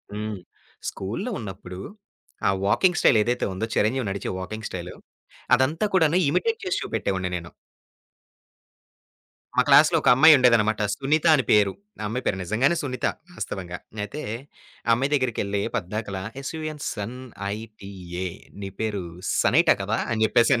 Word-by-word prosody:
హ్మ్. 105 -1 -4 0.5
స్కూల్‌లో 95 +4 -4
ఉన్నప్పుడు 95 -3 -8 0.7
ఆ - - +5 0.2
వాకింగ్ 175 - +3
స్టైల్ 115 - +5
ఏదైతే 120 +2 0
ఉందో, 95 +4 -2
చిరంజీవి 115 +1 +1
నడిచే 100 0 -3
వాకింగ్ 110 +3 -5
స్టైల్ 90 -1 -6 0.6
అదంతా 145 +10 +1
కూడా 165 - +5 0.2
ఇమిటేట్ 455 - 0
చేసి 390 +1 0
చూపెట్టేవాడిని 95 -1 -2
నేను. 85 0 -9 2.1
మా - - +7
క్లాస్‌లో 150 +4 +7
ఒక - - +3
అమ్మాయి 155 +4 +8
ఉండేదన్నమాట. 110 -4 +3
సునీత 150 +4 0
అని 135 - +1
పేరు. 105 -2 +5 0.3
ఆ - - -6
అమ్మాయి 125 +4 -3
పేరు 95 - +1
నిజంగానే 115 - +2
సునీత, 130 -4 -3 0.3
వాస్తవంగా. 90 - -5 0.3
అయితే 140 +9 -6 0.7
ఆ - - +1
అమ్మాయి 135 +4 +1
దగ్గరికెళ్లి, 115 -7 0
పద్దాక 100 +2 -3 0.3
ఎస్‌యుఎన్‌సన్‌ఐటీఏ. 105 - -6 0.3
నీ 100 - -4
పేరు 105 -3 -1 0.4
సనైటా - - +5
కదా! 105 +3 -1
అని 110 -1 0
చెప్పేసి 120 +3 +4
110 Hz, 130 wpm, -25 LUFS, 100-135 Hz, 2.1 s, అమ్మాయి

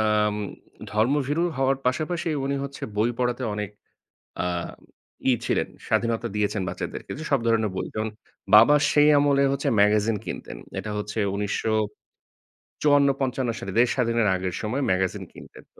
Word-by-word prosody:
আম 105 -1 +2 0.6
ধর্মভীরু 140 +8 +1
হওয়ার 135 0 +2
পাশাপাশি 155 +7 -1 0.2
উনি 140 +1 -1
হচ্ছে 140 0 -7
বই 115 +3 +2
পড়াতে 125 0 0
অনেক 105 -1 -4 0.7
আ - - 0 0.8
ই - - +5
ছিলেন। - - 0 0.2
স্বাধীনতা 115 0 0
দিয়েছেন, 105 -1 0
বাচ্চাদেরকে 90 +1 -6
যে 155 - -6
সব 140 -3 +3
ধরনের 110 -3 +2
বই। - - -2
যেমন, 110 0 -2 0.5
বাবা 115 +7 +8 0.2
সেই 150 0 +5
আমলে 140 -1 +3
হচ্ছে 140 - -1
ম্যাগাজিন 105 +1 +3
কিনতেন। - - -6 0.2
এটা 110 - -4
হচ্ছে 105 +2 -5 0.2
১৯৫৪-৫৫ 130 +5 -1
সালে 95 - -5
দেশ 125 - +6
স্বাধীনের 115 -3 +1
আগের 90 -1 -3
সময়ে 125 +6 -1
ম্যাগাজিন 95 0 0
কিনতেন। - - -13
তো - - -20
115 Hz, 140 wpm, -25 LUFS, 105-140 Hz, 0.8 s, বাবা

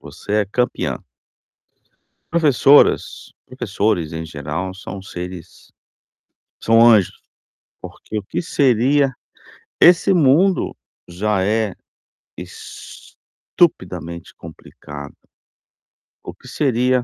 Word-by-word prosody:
Você 80 +8 -9
é - - -4
campeã. 125 +5 -2 1.3
Professoras, 145 -3 +3
professores, 90 -7 -2
em 80 0 -4
geral, 80 +4 -5
são 95 0 -8
seres 90 -2 -9 0.9
são 115 0 +3
anjos. 105 -6 +3 0.6
Porque 110 - -8
o 105 - -4
que - - -4
seria 135 -2 +2 0.7
esse 180 +3 +5
mundo 170 +4 +3 0.3
já 95 +2 -1
é 110 0 0 0.6
estupidamente 85 0 -4
complicado. 70 -1 -11 1.1
O - - -7
que - - -18
seria 125 -2 +1
105 Hz, 85 wpm, -19 LUFS, 90-135 Hz, 1.3 s, esse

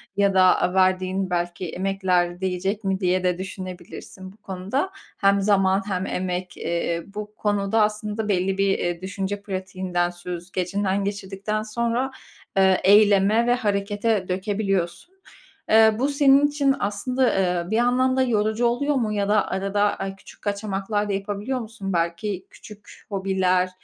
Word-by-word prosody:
ya 200 -1 +3
da, 190 - +5 0.2
aaa, 180 - +1
verdiğin 185 0 +1
belki 175 0 -2
emekler 185 -2 0
değecek 190 +3 -2
mi, 190 -1 0
diye 185 -1 +1
de 180 -1 +1
düşünebilirsin 185 0 -8
bu 205 - -21
konuda. 200 - -3 0.3
Hem 200 0 +3
zaman 195 -1 +3
hem 185 -1 -2
emek, 180 -1 -3
eee, 170 0 -2
bu 210 +1 -8
konuda 205 +1 +1
aslında 210 0 -1
belli 190 0 +1
bir, 195 0 +2
eee, 175 0 -2
düşünce 195 +1 -4
pratiğinden, 185 -2 -2
süzgecinden 180 +3 -3
geçirdikten 200 +1 -3
sonra, 235 +4 -1 0.5
eee, 190 -1 +4
eyleme 205 +2 +5
ve 245 - +4
harekete 205 -2 0
dökebiliyorsun. 195 - -2 0.6
Eee, 220 0 +6
bu 265 - +2
senin 280 0 +5
için 285 -2 +1
aslında, 245 +6 0
eee, 180 -1 0
bir - - +1
yandan 250 +2 +2
da - - +4
yorucu 220 -1 +1
oluyor 285 +5 +1
mu 225 -5 0
ya 200 -1 -1
da 210 -1 +3
arada 195 +2 -1 0.2
ay 195 0 -4
küçük 195 - -16
kaçamaklar 205 0 -2
da - - 0
yapabiliyor 205 +6 -3
musun? 220 -4 -6
Belki 170 +3 -2
küçük 210 -1 -14
hobiler, 190 -2 +1
195 Hz, 145 wpm, -23 LUFS, 185-215 Hz, 0.6 s, Eee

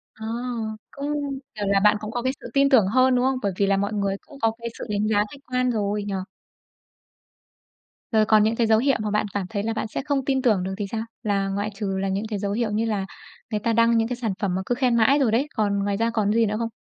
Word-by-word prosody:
À, 220 - -8 0.7
cũng 285 +1 -3 0.4
kiểu 210 -1 -3
là, 200 0 +3
bạn 210 0 +5
cũng 215 0 -6
có 240 +1 -2
cái 260 +1 0
sự - - -8
tin 275 0 +4
tưởng 235 -8 +5
hơn, 255 +4 +4
đúng 250 0 +2
không? 265 0 +1
Bởi 200 - 0
vì 200 - +3
là 195 0 +3
mọi 200 +2 -1
người 200 -2 0
cũng 275 - -15
có 225 - +3
cái 235 0 -6
sự - - -6
đánh 210 0 0
giá 215 -1 +2
khách 280 - -12
quan 250 0 +2
rồi, 205 -1 -1
nhỉ? 200 - -3 2.0
Rồi 220 -2 +4
còn 215 -1 +5
những 220 +2 +2
cái 230 -1 +1
dấu 220 0 +5
hiệu 270 +2 +2
mà 210 -1 -2
bạn 210 0 +1
cảm 200 -2 -1
thấy 205 -2 -2
là 225 - -1
bạn 220 0 -3
sẽ 215 - -4
không 280 -3 0
tin 265 -1 +1
tưởng 215 -8 +2
được 190 - -3
thì 205 - -2
sao? 225 - -2 0.2
Là 200 -2 0
ngoại 205 +2 -2
trừ 195 -1 -2
là 195 - -1
những 195 +3 -1
cái 210 -3 -2
dấu 200 0 -2
hiệu 220 +1 -1
như 220 +2 0
là 205 -3 -1 0.5
người 210 - 0
ta 230 +2 0
đăng 230 +1 +4
những 225 0 +2
cái 245 - -3
sản 230 -4 -2
phẩm 190 -3 0
mà 190 - -1
cứ 245 - 0
khen 250 -2 +2
mãi 270 +6 +4
rồi 250 -6 +2
đấy, 255 +6 +2
còn 205 -2 +1
ngoài 200 0 0
ra 230 +2 +1
còn 210 -2 +1
cái 230 - +3
gì - - +5
nữa 210 0 -1
không? 230 -1 -1
220 Hz, 280 wpm, -24 LUFS, 205-240 Hz, 2.0 s, bạn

